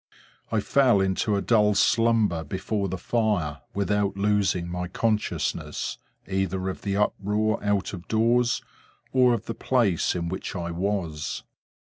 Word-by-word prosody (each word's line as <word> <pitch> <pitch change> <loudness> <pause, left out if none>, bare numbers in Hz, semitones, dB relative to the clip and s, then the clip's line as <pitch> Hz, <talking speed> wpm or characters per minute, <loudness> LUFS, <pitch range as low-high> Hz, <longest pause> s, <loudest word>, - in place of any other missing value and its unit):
I 110 - +2
fell 125 -3 +4
into 95 +2 +1
a 100 - -1
dull 105 -3 +3
slumber 110 -5 +3
before 100 +5 -2
the 95 - -3
fire, 90 - 0
without 100 0 0
losing 100 -3 +1
my 90 +1 -3
consciousness, 110 +4 -2 0.3
either 95 -1 -1
of 95 - -6
the 100 -1 -1
uproar 105 +1 0
out 105 -1 0
of 90 -2 -8
doors, 120 +2 +2 0.5
or 125 -2 +5
of 110 - -6
the 115 - -3
place 115 -11 +1
in 85 -1 -2
which 95 +3 -5
I 85 -2 -3
was. 85 -4 -2
100 Hz, 140 wpm, -26 LUFS, 95-110 Hz, 0.5 s, or